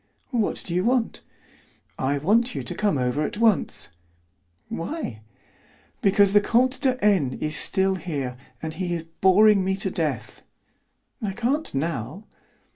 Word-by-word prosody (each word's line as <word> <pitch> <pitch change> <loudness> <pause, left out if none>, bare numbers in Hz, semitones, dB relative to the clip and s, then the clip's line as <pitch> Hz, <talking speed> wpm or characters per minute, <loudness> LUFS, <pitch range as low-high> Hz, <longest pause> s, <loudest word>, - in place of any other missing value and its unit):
"What 230 -5 -1
do 170 - -4
you 180 +1 +1
want?" 245 0 0 0.8
"I 135 +2 0
want 225 - +2
you - - -3
to - - -5
come 205 -8 0
over 125 +3 0
at 155 - -2
once." 220 - +1 0.8
"Why?" 165 - -5 0.8
"Because 200 0 +4
the 205 - +6
Comte 255 +5 +2
de 260 -2 +1
N. 170 -12 +2
is 155 0 -2
still 190 -1 +2
here, 145 -9 -4 0.3
and 160 0 -3
he 175 +1 -2
is 165 - -4
boring 190 +4 +4
me 190 +1 0
to 195 - -1
death." - - -3 0.8
"I 205 -3 -2
can't 260 +9 -1
now." 150 - -3
190 Hz, 145 wpm, -24 LUFS, 155-220 Hz, 0.8 s, the